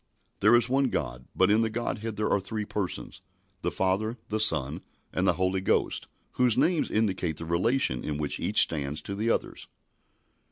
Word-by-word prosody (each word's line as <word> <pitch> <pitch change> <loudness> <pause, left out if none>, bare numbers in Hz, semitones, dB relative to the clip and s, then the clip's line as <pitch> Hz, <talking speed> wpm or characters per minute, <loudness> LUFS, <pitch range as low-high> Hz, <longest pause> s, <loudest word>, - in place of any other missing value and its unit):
There 105 +4 +5
is 120 - +4
one 135 +2 +2
God, 60 - -4
but 95 +2 +3
in 110 +2 +4
the 115 - +1
Godhead 110 -1 -3
there 105 +1 -1
are 100 - +3
three 105 +2 -4
Persons, 100 -3 -5 0.4
the - - 0
Father, 100 +5 -1
the 110 - -1
Son, 80 -10 +2 0.3
and - - 0
the - - +5
Holy 95 +2 0
Ghost, 95 - 0 0.2
whose 125 -3 +2
names 170 -2 +2
indicate 95 -7 -1
the 80 - -6
relation 85 - +1
in 75 -1 -3
which 75 -1 -2
each - - +4
stands 75 -1 +1
to 100 - -5
the 110 +4 -1
others. - - -2
100 Hz, 185 wpm, -27 LUFS, 85-110 Hz, 0.4 s, There